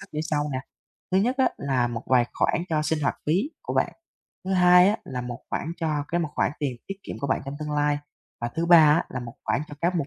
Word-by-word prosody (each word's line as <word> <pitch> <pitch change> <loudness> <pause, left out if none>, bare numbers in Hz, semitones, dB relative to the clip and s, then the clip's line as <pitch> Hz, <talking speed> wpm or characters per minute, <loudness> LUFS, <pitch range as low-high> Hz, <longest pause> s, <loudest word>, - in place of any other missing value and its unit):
pháp - - -10
như 150 - -2
sau 150 -1 +1
nè. 130 - -1 0.5
Thứ 190 - +5
nhất 245 +6 +1
á 265 - +5
là 130 -3 +1
một 115 -1 -5
vài 125 -2 +4
khoản 170 - +1
cho 155 -2 +1
sinh 155 0 0
hoạt - - +1
phí 185 - +1
của - - -4
bạn, - - +1 0.5
thứ 190 - -2
hai 180 0 +7
á 210 - +2
là 125 -2 -4
một 120 -1 -6
khoản 165 - -2
cho 155 -3 -1
cái 175 - 0
một 165 - -1
khoản - - +1
tiền 135 -4 -2
tiết 195 - -4
kiệm - - -7
của 140 - -1
bạn 130 - +1
trong 140 +1 -5
tương 150 - -4
lai, 145 0 +1 0.4
và 120 - -1
thứ 165 +1 0
ba 175 - +8
á 155 +1 +5
là 125 - -5
một 120 -1 -8
khoản - - +1
cho 145 - -8
các 175 +2 +1
mục 150 -5 -1
150 Hz, 270 wpm, -25 LUFS, 135-175 Hz, 0.5 s, ba